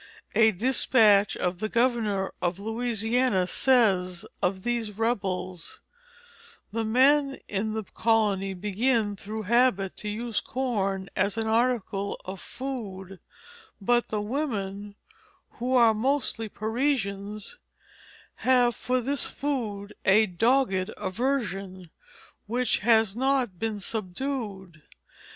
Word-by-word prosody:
A 220 +1 +5
despatch 215 -2 +3
of 180 0 -2
the 215 - -2
governor 230 -5 +1
of 175 0 0
Louisiana 225 -1 0
says 185 -7 +2 0.2
of 185 +1 0
these 230 -4 -2
rebels: 190 -6 -2 0.9
"The 225 +2 -1
men 270 +5 +3
in 210 +2 -2
the 220 0 -3
colony 205 -3 +1
begin 210 +3 0
through 215 +3 -6
habit 210 -3 +2
to 210 - -5
use 230 +1 -2
corn 195 -7 -2
as 200 +3 +1
an 225 0 -1
article 220 -4 0
of 190 0 -7
food; 195 -8 -6 0.6
but 240 +4 +2
the 210 -1 -2
women, 205 -6 -3 0.6
who 250 +2 0
are 230 -3 +6
mostly 225 -1 -1
Parisians, 215 - -2 0.8
have 245 -2 +3
for 255 0 -1
this 275 +3 -1
food 215 -8 -3
a 210 +3 +5
dogged 200 0 +1
aversion, 195 -6 -3 0.6
which 245 +2 0
has 220 -2 +3
not 255 -7 0
been 220 -2 -2
subdued. 195 - -4
220 Hz, 110 wpm, -27 LUFS, 195-245 Hz, 0.9 s, are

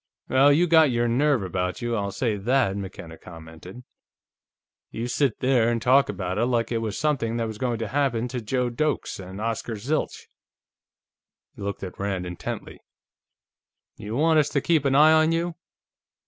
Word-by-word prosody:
"Well, 135 +2 +5
you 160 +5 +4
got 160 -3 +5
your 120 -1 +1
nerve 130 0 +2
about 90 0 -3
you, 120 0 -1
I'll 100 -2 -2
say 115 0 -1
that," 115 0 +1
McKenna 90 -4 -8
commented. 85 +6 -12 1.1
"You 115 +2 -4
sit 130 -1 0
there 125 -3 +3
and 120 -1 0
talk 130 +4 +4
about 95 0 -3
it 120 - +2
like 120 -2 0
it 115 - 0
was 110 -4 -4
something 120 -7 0
that 115 - -1
was 110 -1 -6
going 120 -2 -1
to 115 0 -4
happen 125 -2 0
to 125 0 -4
Joe 125 +2 -1
Doakes 150 -3 -2
and 95 +1 -9
Oscar 115 +1 -3
Zilch." 130 +9 -3 1.3
He - - -12
looked 100 0 -4
at 95 - -8
Rand 95 -2 -2
intently. 90 -1 -6 1.2
"You 110 +1 -6
want 160 +3 +3
us 150 -1 +1
to 140 - 0
keep 160 -2 +1
an 135 -1 +2
eye 155 +2 +7
on 160 0 +4
you?" 170 +1 -1
120 Hz, 175 wpm, -24 LUFS, 100-140 Hz, 1.3 s, eye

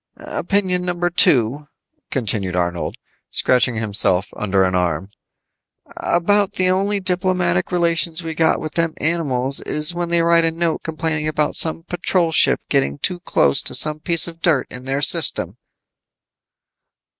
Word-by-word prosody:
"Opinion 185 -3 -1
number 175 -1 -2
two," 140 -2 +2 0.4
continued 100 -7 -2
Arnold, 85 -1 -2 0.3
scratching 125 -1 +1
himself 100 -3 +1
under 95 -2 0
an 95 0 0
arm. 90 +1 -2 0.8
"About 200 +3 0
the 185 0 0
only 200 +2 0
diplomatic 180 -1 -1
relations 170 -1 +1
we 165 -1 -4
got 160 0 +1
with 155 - -6
them 165 -1 -1
animals 140 -5 -1
is 150 +3 +1
when 175 0 -3
they 170 -1 +2
write 170 0 +3
a 165 - +4
note 165 0 -2
complaining 160 -1 -2
about 150 -1 -1
some 165 0 +1
Patrol 175 -1 -1
ship - - +3
getting 70 +1 0
too 180 - -3
close 70 - +1
to - - -1
some 155 0 +2
piece 170 +1 +3
of 165 -1 -11
dirt 160 -6 +1
in 125 +1 -7
their 135 +2 -2
system." - - +3
160 Hz, 145 wpm, -19 LUFS, 125-175 Hz, 0.8 s, a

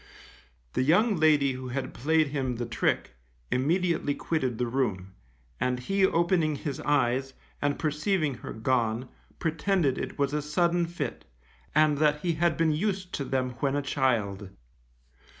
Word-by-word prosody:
The - - +1
young 185 - +4
lady 150 -3 +4
who 130 0 -6
had 130 +1 -4
played 155 +3 +2
him 135 -3 -2
the 120 +1 -3
trick, 115 - -1 0.4
immediately 160 +2 +1
quitted 130 -8 -1
the 125 - 0
room, 105 -7 -2 0.5
and 125 0 0
he 195 +10 0
opening 170 -3 +2
his 140 0 -4
eyes, 135 -2 +1 0.3
and 145 0 +1
perceiving 155 0 0
her - - -8
gone, 120 +1 0 0.3
pretended 160 -2 0
it - - -5
was 140 0 0
a 150 - 0
sudden 170 +3 +1
fit, 160 -7 -5 0.5
and 155 -2 +4
that 150 -1 +2
he 170 0 0
had 170 +1 +1
been 165 -1 +3
used 185 +3 -2
to 140 - -2
them 130 -1 -1
when 140 +1 +1
a 145 - 0
child. 110 -9 0
145 Hz, 150 wpm, -28 LUFS, 130-160 Hz, 0.5 s, young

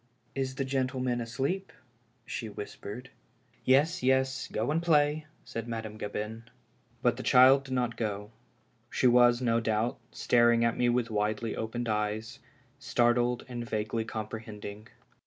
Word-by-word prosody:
"Is 130 -1 -2
the 135 - -2
gentleman 130 -2 -1
asleep? 135 +12 -2 0.3
" 120 0 -40
she 115 - -5
whispered. 105 +4 -8 0.5
Yes, 150 +7 +3
yes 130 0 +1
— - - -21
go 110 +6 -1
and 160 +2 +1
play," 150 -2 +2 0.2
said 115 0 -5
Madame 110 -2 -5
Gabin. 105 +2 -5 0.6
But - - +3
the - - -4
child 130 +2 +6
did 130 -1 -3
not 120 -2 -1
go. 105 -1 -3 0.6
She - - -1
was, 120 0 +5
no 115 -1 +3
doubt, 110 +1 0
staring 120 -1 +3
at 115 - +1
me 120 - +2
with 120 -1 0
widely 105 +1 -1
opened 120 +2 -3
eyes, 105 0 -2 0.4
startled 120 0 +1
and 120 -2 -6
vaguely 110 +1 -1
comprehending. 110 -1 -7
120 Hz, 145 wpm, -29 LUFS, 110-130 Hz, 0.6 s, child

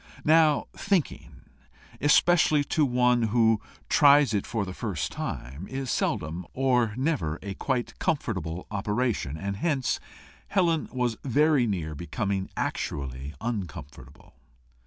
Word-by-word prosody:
Now 155 -1 +4
thinking, 195 -6 -2 0.6
especially 150 +1 +4
to 150 0 +1
one 125 -1 +3
who 115 -1 +3 0.3
tries 145 -5 +5
it 100 - -1
for 110 -3 -2
the 95 - -6
first 95 -7 -3
time, 65 +10 -6
is 135 -1 -4
seldom, 80 +4 -1
or 125 -5 +2
never, 130 - -1
a 100 0 -4
quite 125 +4 -3
comfortable 95 - -2
operation, 105 - -1
and 100 +4 -4
hence 140 0 0 0.5
Helen 170 -5 +1
was 125 -3 -1
very 145 -1 +3
near 85 -7 -2
becoming 95 - -3
actually 70 +1 -3
uncomfortable. 95 - -7
115 Hz, 115 wpm, -27 LUFS, 95-140 Hz, 0.6 s, tries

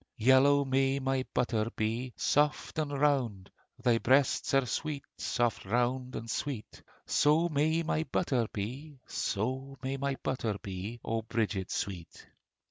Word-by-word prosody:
Yellow 130 +4 +5
may 135 +1 +2
my 135 -1 0
butter 115 -3 0
be, 115 +4 -1
Soft 150 +2 +1
and 150 -2 -1
round: 135 -9 0 0.3
Thy 120 -2 +4
breasts 135 +3 +3
are 135 -1 +4
sweet, 145 +4 -3
Soft, 120 -2 0
round, 125 +4 0
and 115 - -5
sweet, 125 -2 -4 0.2
So 160 +4 +3
may 160 +2 +2
my 160 0 0
butter 130 -12 0
be: 135 +9 -5
So 130 +6 -2
may 135 +1 -2
my 140 0 -1
butter 115 -6 -1
be, 100 +5 -5
O 115 0 -1
Bridget 105 -4 -2
sweet! 90 -4 -5
130 Hz, 135 wpm, -31 LUFS, 115-140 Hz, 0.3 s, Yellow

